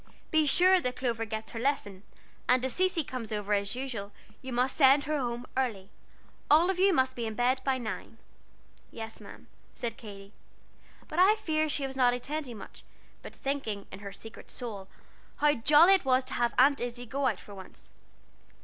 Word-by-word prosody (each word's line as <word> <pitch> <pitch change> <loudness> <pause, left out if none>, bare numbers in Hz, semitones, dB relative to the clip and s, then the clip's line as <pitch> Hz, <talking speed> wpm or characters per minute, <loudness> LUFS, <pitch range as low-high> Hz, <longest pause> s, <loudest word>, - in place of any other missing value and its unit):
"Be 315 -1 +3
sure 370 +6 +5
that 250 -3 -2
Clover 235 -3 -2
gets 220 0 -5
her 225 - -6
lesson, 225 -7 -1 0.5
and 250 +1 +4
if 260 - 0
Cecy 365 -1 +1
comes 250 -5 -6
over 210 -1 -2
as 200 +2 0
usual, 240 -6 -5 0.3
you 260 - -7
must 250 +2 +1
send 275 0 +6
her 305 +1 -2
home 240 -1 -3
early. 220 -7 -2 0.6
All 330 +5 +5
of 370 - -5
you 390 +1 +5
must 260 -6 +1
be 235 -2 -3
in 220 - -5
bed 255 +3 +1
by 265 -1 +1
nine." 225 -1 -6 0.7
"Yes'm," 225 0 -9 0.3
said 230 -2 -4
Katy, 200 -2 -11 0.7
but 315 - -4
I 390 +4 +6
fear 310 -7 -1
she 290 -2 -1
was 265 0 -6
not 245 -2 +3
attending 255 -1 -5
much, - - -12 0.4
but - - -11
thinking, 250 -8 -3
in - - -9
her 200 0 -8
secret 220 +3 -11
soul, 215 -6 -6 0.5
how 295 0 +3
jolly 300 +9 +6
it 385 - +3
was 260 -1 +3
to 255 - -8
have 240 -1 0
Aunt 275 +2 +5
Izzie 245 0 -4
go 270 +3 -1
out - - -1
for 205 - -12
once. 190 -1 -11
255 Hz, 185 wpm, -29 LUFS, 225-285 Hz, 0.7 s, send